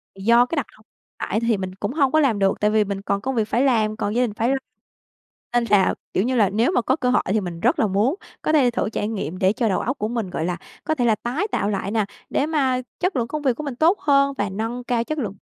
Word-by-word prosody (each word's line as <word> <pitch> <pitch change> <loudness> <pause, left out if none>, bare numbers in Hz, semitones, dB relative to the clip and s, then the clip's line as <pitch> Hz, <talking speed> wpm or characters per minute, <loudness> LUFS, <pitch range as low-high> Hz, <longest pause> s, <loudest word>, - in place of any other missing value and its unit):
Do 235 +5 +4
cái 290 - -4
đặc 285 - 0
thù 215 - -22 0.4
tại 210 - -1
thì 230 -2 +1
mình 185 -1 -5
cũng 205 +4 -3
hông 275 -4 +2
có 310 - +4
làm 255 -9 +2
được, 195 -1 +2
tại 210 0 +2
vì 215 0 +3
mình 200 -1 -4
còn 200 0 -1
công 265 +3 -2
việc 220 -2 +1
phải 240 - +1
làm, 220 -5 +2
còn 205 +1 -2
gia 245 - +3
đình 230 -4 -2
phải 230 +3 0
lo. 270 - +2 1.0
Nên 240 -1 +2
là, 200 -2 +4 0.2
kiểu 190 - +2
như 255 +3 0
là, 210 -5 +4
nếu 225 - +1
mà 305 - +2
có 260 +3 +1
cơ 255 -5 -1
hội 250 - +3
thì 210 +3 +1
mình 175 -3 -6
rất - - +2
là 220 - +3
muốn 205 - +1 0.3
có - - 0
thể 265 -5 +4
thử 235 - -1
trải 210 -1 -2
nghiệm, 190 -5 -4
để 190 +1 +3
cho 225 -1 0
đầu 190 - +1
óc 255 +4 -2
của 215 - -1
mình, 225 -4 -3
gọi 165 - -3
là, 175 0 -2 0.3
có 315 - 0
thể 245 -5 0
là 225 -2 +4
tái 245 - -2
tạo 200 - 0
lại 195 -1 -2
nà, 220 -2 +1 0.2
để 280 - +1
mà 265 -5 +1 0.2
chất 365 0 0
lượng 235 -2 0
công 305 +4 -4
việc 265 -4 +1
của 305 - -5
mình 280 -4 -4
tốt 330 +9 +3
hơn, 275 -1 +3
và 205 -1 -1
nâng 225 +5 -4
cao 240 -1 0
chất 310 +6 -4
lượng 205 -7 -3
230 Hz, 290 wpm, -22 LUFS, 205-260 Hz, 1.0 s, Do